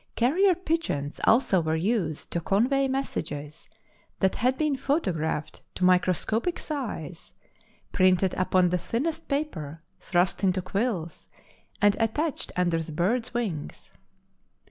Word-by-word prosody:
Carrier 350 +11 +3
pigeons 315 - -2
also 220 -6 +4
were 160 0 0
used 170 -3 -1
to 170 - 0
convey 255 - +2
messages 155 - -4 0.5
that 190 -1 +2
had 255 +3 +1
been 305 -2 +1
photographed 185 - -1
to - - -3
microscopic 185 - +2
size, 215 - -6 0.6
printed 185 -1 +3
upon 185 -1 +2
the 180 +1 0
thinnest 285 - -2
paper, 165 - -3 0.2
thrust 175 +2 0
into 185 -1 +2
quills, 185 -4 -3 0.5
and 205 -1 +5
attached 270 +7 -1
under 175 -2 +1
the 160 - -7
birds' 230 +10 -1
wings. 200 -11 -4
195 Hz, 120 wpm, -27 LUFS, 170-260 Hz, 0.6 s, and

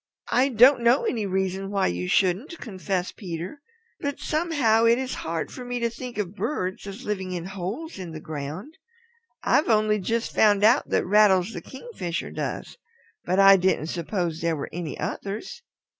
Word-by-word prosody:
"I 260 +3 +3
don't 250 +2 +6
know 235 +3 +4
any 220 -4 -1
reason 190 0 -1
why 200 -1 +1
you 90 +1 -1
shouldn't," 195 - +1
confessed 190 - -4
Peter. 180 - -6 0.4
"But 285 0 -3
somehow 290 -9 +2
it 230 +1 +5
is 260 0 -3
hard 165 0 -3
for 255 - -8
me 245 0 -3
to 235 -1 0
think 245 0 -8
of 195 -3 -2
birds 200 -5 -3
as 200 +6 -8
living 190 -3 -3
in 175 -1 -4
holes 200 - -5
in 180 -2 -6
the 160 -1 -7
ground. 155 - -7 0.6
I've 305 - +3
only 215 -1 +3
just 230 +4 -2
found 205 -2 +4
out 235 +6 +4
that - - +1
Rattles 200 0 +4
the - - -6
Kingfisher 260 - -6
does. - - -5 0.5
But 185 +2 0
I 195 0 +8
didn't 180 -3 0
suppose 170 -2 -2
there 165 -1 +1
were 145 - -5
any 170 -2 -5
others. 205 - -5
200 Hz, 175 wpm, -25 LUFS, 180-235 Hz, 0.6 s, I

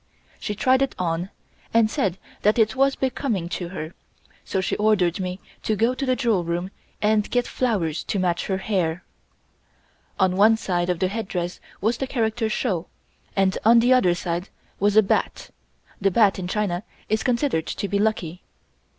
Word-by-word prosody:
She 210 - -3
tried 260 +5 +3
it 275 - 0
on, 175 +1 -1 0.5
and 230 -1 +6
said 195 -4 -1 0.2
that 210 +3 +3
it 220 +1 +3
was 275 +1 +3
becoming 255 -8 -1
to 175 0 -4
her, 165 -2 -6 0.5
so 190 - -2
she 190 - -1
ordered 205 -5 +2
me 185 0 -3 0.2
to 215 - 0
go 230 +4 +2
to 275 +2 -3
the 255 - +3
jewel 230 -8 +1
room 175 +3 -3 0.3
and 210 0 +2
get 245 -1 +1
flowers 180 -11 -1
to - - -2
match 180 -2 0
for 195 - -1
her 190 - -2
hair. 180 -5 -1 1.2
On 185 -1 +3
one 215 +3 +5
side 175 -4 -1
of 180 - +1
the 185 - +1
headdress 185 -4 -3 0.2
was 225 +4 +1
the 270 - -3
character 225 -2 0
(shou) 195 -6 -1 0.5
and 190 -1 +2
on 230 +2 +6
the 245 +2 +5
other 185 -9 +4
side 175 +1 -3 0.3
was 205 +1 +2
a 220 - +8
bat 195 - -1 0.5
(the 195 - +4
bat 200 -1 +3
in 180 - -4
China 185 -3 -1 0.3
is 220 +1 +1
considered 240 - 0
to 200 - -3
be 200 0 0
lucky). 190 -5 -1
200 Hz, 180 wpm, -24 LUFS, 180-225 Hz, 1.2 s, a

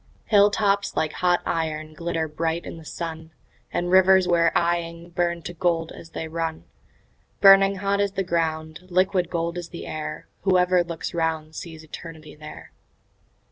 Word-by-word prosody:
Hill 205 -1 +5
tops 200 -1 0
like 155 -1 0
hot 180 -1 +2
iron 155 -1 -2
glitter 165 0 -2
bright 160 +2 -2
in - - -7
the 165 - -12
sun, 160 0 -6 0.4
And 175 0 -1
the 175 - -2
rivers 190 0 +6
we're 170 -1 +3
eying 170 0 -1
burn 170 -1 -1
to 175 - -6
gold 165 -1 0
as 165 - -11
they 160 - -5
run; 160 0 -3 0.8
Burning 195 0 +7
hot 200 +1 0
is 200 -1 0
the 195 0 -1
ground, 160 -3 -2
liquid 185 -1 +2
gold 170 0 -2
is 170 -1 -8
the 170 - -8
air; 155 0 -6
Whoever 180 -1 +3
looks 170 -2 -5
round 160 -2 -1
sees 160 -1 -8
Eternity 155 -1 -10
there. 150 0 -11
170 Hz, 165 wpm, -24 LUFS, 160-180 Hz, 0.8 s, Burning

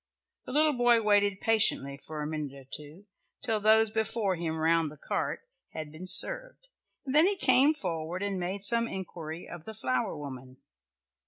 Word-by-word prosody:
The - - -6
little 305 +2 +2
boy 240 -2 +3
waited 205 -2 +2
patiently 170 -11 +2
for 155 -1 -7
a - - -4
minute 150 -3 -5
or 135 - -13
two, 150 +7 -8 0.4
till 225 -2 -1
those 220 +1 +4
before 220 -3 -1
him 165 -2 -4
round 165 0 +1
the 150 - -14
cart 150 - -4 0.3
had 155 -2 -7
been 165 +4 -10
served, - - +2 0.4
and 265 - -4
then 310 +4 +6
he 405 - +6
came 265 +1 +5
forward 170 - -5
and 200 -2 -2
made 190 +3 -4
some 230 +2 +3
inquiry 170 -5 -8
of 175 -2 -11
the 220 - -8
flower 130 -9 -2
woman. 130 -3 -9
190 Hz, 175 wpm, -28 LUFS, 155-230 Hz, 0.4 s, then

